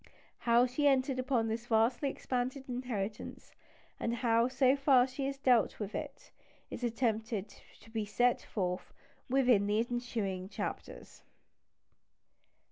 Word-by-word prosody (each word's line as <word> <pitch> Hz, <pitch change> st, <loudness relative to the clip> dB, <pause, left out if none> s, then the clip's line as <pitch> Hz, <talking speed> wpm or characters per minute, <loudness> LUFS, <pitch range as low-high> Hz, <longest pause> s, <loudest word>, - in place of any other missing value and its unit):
How 235 Hz, +1 st, +6 dB
she 255 Hz, +4 st, +1 dB
entered 265 Hz, -1 st, +2 dB
upon 255 Hz, -3 st, +1 dB
this 230 Hz, +2 st, -3 dB
vastly 240 Hz, +5 st, +2 dB
expanded 255 Hz, +1 st, -3 dB
inheritance, 235 Hz, -5 st, -5 dB, 0.5 s
and 235 Hz, 0 st, -1 dB
how, 230 Hz, -1 st, +2 dB
so 260 Hz, +1 st, +3 dB
far, 275 Hz, -3 st, +5 dB
she 270 Hz, +1 st, -4 dB
has 275 Hz, 0 st, -4 dB
dealt 250 Hz, -4 st, +2 dB
with 210 Hz, -1 st, -4 dB
it, -, -, -7 dB, 0.4 s
is 245 Hz, -, -6 dB
attempted 225 Hz, -3 st, -1 dB, 0.3 s
to 225 Hz, -, -17 dB
be 220 Hz, -1 st, -1 dB
set 245 Hz, +4 st, +2 dB
forth 180 Hz, -3 st, -3 dB, 0.4 s
in 245 Hz, -6 st, +3 dB
the 210 Hz, +1 st, +1 dB
ensuing 225 Hz, -6 st, -2 dB
chapters. -, -, -6 dB
240 Hz, 125 wpm, -32 LUFS, 220-255 Hz, 0.5 s, How